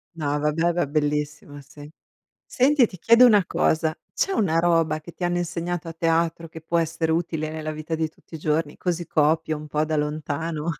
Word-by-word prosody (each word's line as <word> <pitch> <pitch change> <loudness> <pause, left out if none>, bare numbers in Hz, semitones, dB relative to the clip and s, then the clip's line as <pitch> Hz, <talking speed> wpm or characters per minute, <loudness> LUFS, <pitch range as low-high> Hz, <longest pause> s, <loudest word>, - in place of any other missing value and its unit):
No, 145 -2 -1
va 150 +1 +1
beh, 165 +2 -1
era 175 -1 +1
bellissima, 150 0 -2
sì. 145 +1 -13 0.6
Senti, 265 -1 +3
ti 185 - -12
chiedo 230 +6 +6
una 205 -5 +5
cosa, 160 0 +1 0.2
c'è 390 - 0
una 170 - +1
roba 165 -2 +2
che 170 +2 -12
ti - - -12
hanno 175 0 0
insegnato 175 0 -3
a - - -5
teatro 165 0 0
che 160 0 -10
può 170 +2 -1
essere 165 0 -1
utile 160 -2 -2
nella 155 0 -4
vita 155 +1 -5
di 160 0 -1
tutti 160 - -18
i - - -5
giorni, 150 0 -1
così 175 -1 -2
copio 155 0 +1
un 150 0 -9
po' 150 +1 0
da 155 0 -1
lontano? 150 +2 -2
160 Hz, 200 wpm, -24 LUFS, 155-170 Hz, 0.6 s, chiedo